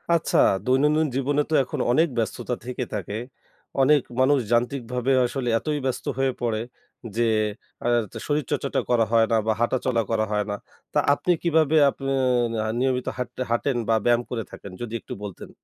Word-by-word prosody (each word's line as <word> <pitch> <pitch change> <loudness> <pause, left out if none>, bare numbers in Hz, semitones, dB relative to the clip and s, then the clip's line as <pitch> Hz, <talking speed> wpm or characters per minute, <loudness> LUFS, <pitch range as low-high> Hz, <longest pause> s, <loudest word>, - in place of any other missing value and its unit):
আচ্ছা, 165 - +1 0.3
দৈনন্দিন 150 +5 +3
জীবনে 140 +2 +1
তো - - -2
এখন - - -5
অনেক 160 +7 +4
ব্যস্ততা 115 +2 -2
থেকে 125 0 -3
থাকে। 100 0 -4 0.7
অনেক 145 +1 +5 0.2
মানুষ 135 +2 +4
যান্ত্রিকভাবে 125 +1 0
আসলে 125 0 -2
এতই 150 +2 -2
ব্যস্ত 130 - -2
হয়ে 135 0 +2
পড়ে 115 -2 0 0.5
যে, 120 +1 +2 0.6
আতা 120 -4 0
শরীর 145 -1 0
চর্চাটা - - 0
করা 120 -2 +3
হয় 115 -1 +5
না 115 - +4
বা 110 - +3
হাঁটা 120 +2 +2
চলা 120 -3 +2
করা 110 -1 +1
হয় 105 -1 0
না। 105 - -1 0.4
তা 150 - +3
আপনি 180 - 0
কিভাবে 160 -2 +3
আপে 135 - -9 0.5
না 110 - -1 0.2
নিয়মিত 130 -1 0
হাট 125 -1 -3 0.2
হাঁটেন? 120 +3 0
বা 115 - +5
ব্যায়াম 120 0 +4
করে 115 -2 -3
থাকেন? 100 - -10
যদি 120 -2 -5
একটু - - -8
বলতেন। 100 -3 -8
125 Hz, 175 wpm, -24 LUFS, 115-140 Hz, 0.7 s, অনেক